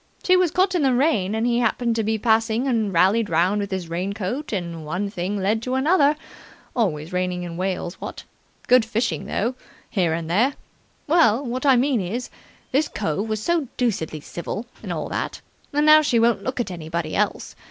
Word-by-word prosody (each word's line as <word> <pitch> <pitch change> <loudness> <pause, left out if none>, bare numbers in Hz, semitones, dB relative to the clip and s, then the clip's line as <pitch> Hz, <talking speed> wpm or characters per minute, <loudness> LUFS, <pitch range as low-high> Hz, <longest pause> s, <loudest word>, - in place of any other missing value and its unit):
She 370 - +5
was 365 -1 +3
caught 370 +4 +2
in 355 - +1
the 265 -3 +3
rain, 230 - +2
and 220 +1 0
he 240 0 +2
happened 235 0 +1
to 225 - 0
be 220 +1 0
passing 225 +2 +2
and 225 -5 +1
rallied 195 +5 +3
round 180 +5 +2
with 200 - -4
his 190 -3 -3
rain 180 +4 -2
coat, 220 +9 -4
and 170 -5 -4
one 180 +6 -3
thing 190 +2 -3
led 210 +4 +1
to 255 +2 -2
another. 290 +1 +4 0.6
Always 170 - -1
raining 180 -1 -1
in 170 -1 -6
Wales, 185 -1 -3
what! - - -7 0.4
Good 250 -1 +6
fishing, 225 +2 -1
though, 235 +5 -1 0.4
here 175 -6 +1
and 165 -1 -4
there. 230 - +2 0.5
Well, 285 -6 +3
what 255 +3 -2
I 270 - +7
mean 250 -2 +2
is, 220 +8 -4 0.4
this 290 +3 +2
cove 200 +8 -2
was 215 -1 -2
so 340 -5 +1
deucedly 165 - -1
civil, 185 +8 -5 0.2
and - - -6
all - - -3
that, - - -3 0.3
that 295 +1 +1
now 305 0 +8
she 250 -6 +2
won't 230 0 +3
look 260 0 -3
at 230 -5 -2
anybody 165 -1 -4
else. 210 0 -1
220 Hz, 195 wpm, -23 LUFS, 185-255 Hz, 0.6 s, now